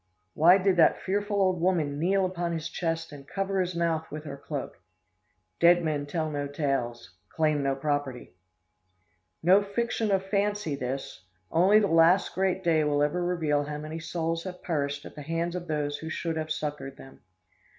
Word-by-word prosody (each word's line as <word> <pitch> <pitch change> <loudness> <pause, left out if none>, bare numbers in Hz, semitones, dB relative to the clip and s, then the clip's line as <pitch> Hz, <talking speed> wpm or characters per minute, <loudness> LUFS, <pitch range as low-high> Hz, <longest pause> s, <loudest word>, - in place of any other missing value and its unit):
Why 175 +5 +6
did 190 -1 +2
that 165 - +5
fearful 205 +1 -1
old 185 -3 +2
woman 160 -6 +1
kneel 190 +4 +2
upon 175 -2 -2
his 165 0 -3
chest 165 -1 -3
and 140 -2 -11
cover 195 0 -1
his 180 -1 -3
mouth 165 -1 -1
with 150 +1 -7
her 140 -3 -6
cloak? 140 - -6 0.8
Dead 175 +1 +6
men 150 -3 -1
tell 155 0 -2
no 145 -1 -2
tales 135 - -2 0.2
claim 155 -2 +1
no 135 -1 0
property!" 140 -6 -3 1.1
No 185 +4 +6
fiction 220 +2 -1
of 195 -1 +2
the - - -15
fancy, 205 -4 0
this! 130 -7 -5 0.3
Only 185 +6 +5
the 215 - +4
last 165 +2 +4
great 190 0 0
day 160 -3 +3
will 145 -1 +2
ever 170 +5 0
reveal 155 -5 0
how 150 0 -5
many 155 +2 -6
souls 165 0 -2
have 180 -1 -7
perished 145 -3 -2
at - - -10
the 150 - -9
hands 165 +3 -2
of 175 -1 -5
those 145 -2 -2
who 160 - -6
should 165 0 -3
have 155 0 -3
succored 145 -3 -4
them. 135 - -14
165 Hz, 180 wpm, -28 LUFS, 145-180 Hz, 1.1 s, Why